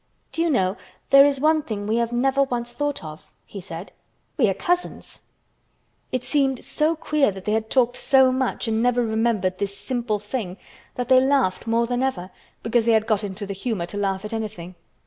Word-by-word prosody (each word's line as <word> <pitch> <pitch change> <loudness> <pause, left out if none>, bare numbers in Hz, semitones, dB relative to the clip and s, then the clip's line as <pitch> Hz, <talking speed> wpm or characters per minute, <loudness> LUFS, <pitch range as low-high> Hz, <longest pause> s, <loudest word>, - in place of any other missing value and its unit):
"Do 330 - -2
you 335 - +2
know 190 -7 +1 0.3
there 275 +1 +9
is 280 -2 0
one 310 +2 +3
thing 210 -7 -5
we 220 +2 0
have 235 0 0
never 265 +3 +2
once 240 -3 -2
thought 290 -6 -2
of," 155 0 -10 0.2
he 200 - -9
said. 175 0 -8 0.4
"We 230 -8 +3
are - - +1
cousins." 355 0 -2 0.9
It 255 -1 -2
seemed 270 -3 0
so 315 +2 0
queer 305 -3 +1
that 190 -1 -8
they 210 - 0
had 220 0 -1
talked 250 -1 +2
so 265 -1 +4
much 255 -1 -1
and 220 0 0
never 245 0 +2
remembered 220 -4 0
this 200 0 -3
simple 240 -4 -2
thing 205 -3 -5 0.4
that 245 -1 -3
they 260 0 +6
laughed 260 -7 +1
more 230 +1 +2
than 245 +1 -1
ever, 195 -9 -2 0.3
because 225 0 +1
they 230 - +5
had 220 -1 +3
got 215 -2 0
into 205 +1 -5
the 200 - -5
humor 195 -2 -3
to 205 - -7
laugh 195 0 -1
at 210 - -6
anything. 210 -6 -5
230 Hz, 205 wpm, -23 LUFS, 205-265 Hz, 0.9 s, there